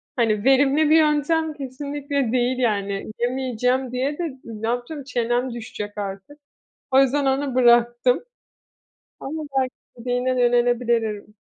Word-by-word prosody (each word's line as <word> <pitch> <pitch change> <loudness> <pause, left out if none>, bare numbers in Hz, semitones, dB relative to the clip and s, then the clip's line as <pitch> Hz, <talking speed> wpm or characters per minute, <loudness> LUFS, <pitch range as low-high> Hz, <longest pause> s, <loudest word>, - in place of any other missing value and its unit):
hani, 220 -5 +1
verimli 275 +3 +4
bir 315 - +6
yöntem 310 +1 +2
kesinlikle 280 -1 -3
değil" 250 +1 +1
yani. 200 -4 -1
Yemeyeceğim 250 0 0
diye 265 +4 -2
de 350 - -3 0.2
ne 225 -1 -6
yapacağım? 245 +5 -3
Çenem 245 -1 -1
düşecek 210 -3 -7
artık. 200 +7 -6 0.5
O 265 0 +6
yüzden 275 +1 +2
onu 270 0 0
bıraktım. 240 0 +4 1.0
Ama 310 +3 -5 0.2
belki 260 -1 +1 0.3
dediğine 250 +2 -1
de - - +1
yönelebilirim. 240 -3 +1
250 Hz, 125 wpm, -22 LUFS, 235-275 Hz, 1.0 s, bir